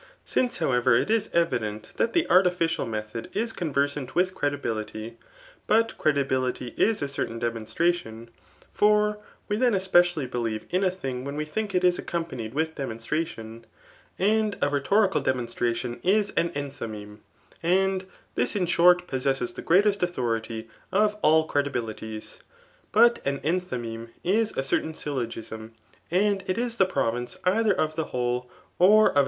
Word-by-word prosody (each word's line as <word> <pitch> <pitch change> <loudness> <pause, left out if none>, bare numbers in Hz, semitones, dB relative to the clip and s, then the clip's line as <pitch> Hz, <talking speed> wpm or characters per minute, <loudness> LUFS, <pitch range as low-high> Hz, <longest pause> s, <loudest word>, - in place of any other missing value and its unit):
Since, 245 -1 0
however, 130 -6 +3
it 210 - +1
is 225 -1 +1
evident 110 -11 -1
that 230 - +1
the 340 - +2
artificial 175 -4 +3
method 110 +1 -5
is 225 +1 -1
conversant 140 -4 -1
with 185 +1 +2
credibility; 115 -6 -3 0.5
but 225 +1 +3
credibility 130 -4 0
is 220 -8 +2
a - - -1
certain 130 -4 -3
demonstration; 115 +1 -2 0.4
for 210 0 +3 0.3
we 205 - 0
then 245 -2 +3
especially' 175 -5 +3
believe 115 -3 -3
in 185 +2 +1
a 190 - +4
thiiig 135 -9 -5
when 140 +1 -5
we 150 +1 -2
think 200 +5 -3
it 180 - +2
is 180 0 +3
accompanied 135 -9 -4
with 160 +1 0
demonstration; 115 -3 -4 0.5
and 215 +1 +2
a 145 - +2
rhetorical 190 +9 +2
demonstratidn 120 -1 -1
is 200 +2 +2
an 170 - +1
enthymeme; 115 -7 -6 0.4
and* 190 +2 +2 0.3
this - - 0
in 190 -3 +1
short 180 +1 +5
possesses 135 +5 -1
the - - -7
greatest 200 +3 +3
authority 115 -9 -2 0.3
<^ 210 +2 +4
ajl 160 +1 +4
crevii. 145 -1 +1
bilitiqsi 110 -2 -5 0.5
but 235 +2 +5
aaendiymeme 130 -6 -2
is 215 +4 +2
a 135 - -1
certidn 160 +3 -1
sylk^^smy 115 -6 -5 0.4
aodr^l^ 190 0 +1
is 235 0 -2
the 190 - +4
province 120 -7 -2
cither 210 +4 +3
of 155 0 0
timmhfokfQX 125 -5 -2 0.3
cf 210 +2 +6
a. - - +6
155 Hz, 140 wpm, -26 LUFS, 120-190 Hz, 0.5 s, cf